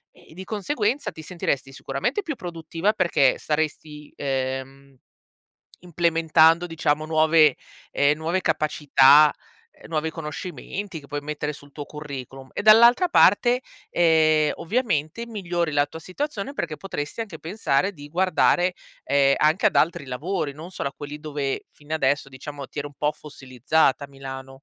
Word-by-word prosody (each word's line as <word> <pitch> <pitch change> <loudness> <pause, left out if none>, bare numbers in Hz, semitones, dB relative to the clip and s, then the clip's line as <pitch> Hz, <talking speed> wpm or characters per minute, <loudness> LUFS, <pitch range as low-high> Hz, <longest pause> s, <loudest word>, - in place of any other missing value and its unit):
e - - -18
di 190 - -7
conseguenza 220 +4 -1
ti 160 - -11
sentiresti 140 -6 -3
sicuramente 140 - -2
più 320 -6 -5
produttiva, 170 +3 -2
perché 170 -9 +2
saresti, 150 -1 -3
ehm, 135 0 -4 0.8
implementando, 165 0 +3
diciamo, 155 -2 -1
nuove, 155 -2 +4 0.4
ehm, 145 +1 +2
nuove 170 +4 -1
capacità, 150 -2 +5 0.4
ehm, - - -16
nuovi 160 0 -1
conoscimenti 170 +3 -6
che 140 - -16
puoi 145 +1 -4
mettere 150 0 -4
sul 145 0 -14
tuo 145 0 -7
curriculum 135 -3 -9
e - - -4
dall'altra 235 - +7
parte, 245 - +4 0.3
ehm, 155 -2 +3
ovviamente, 210 - -1
migliori 175 -7 -2
la 145 0 +2
tua 160 - -10
situazione 210 - -4
perché 170 - -3
potresti 150 +2 -5
anche 190 -8 -7
pensare 185 0 0
di 145 -2 -12
guardare, 180 +1 +2 0.3
ehm, 140 -1 +3
anche 160 +8 +3
ad - - -3
altri 155 -3 +1
lavori, 150 +5 -3
non 155 +5 -10
solo 140 -6 -4
a - - -20
quelli 145 0 -8
dove, 145 -3 -3
fin 150 +1 -9
adesso, 140 -2 +1
diciamo, 140 +1 -9
ti - - -6
eri 145 - -4
un 145 - -17
po' 150 0 0
fossilizzata 135 0 0
a - - -7
Milano. 135 -1 -8
155 Hz, 150 wpm, -24 LUFS, 145-180 Hz, 0.8 s, dall'altra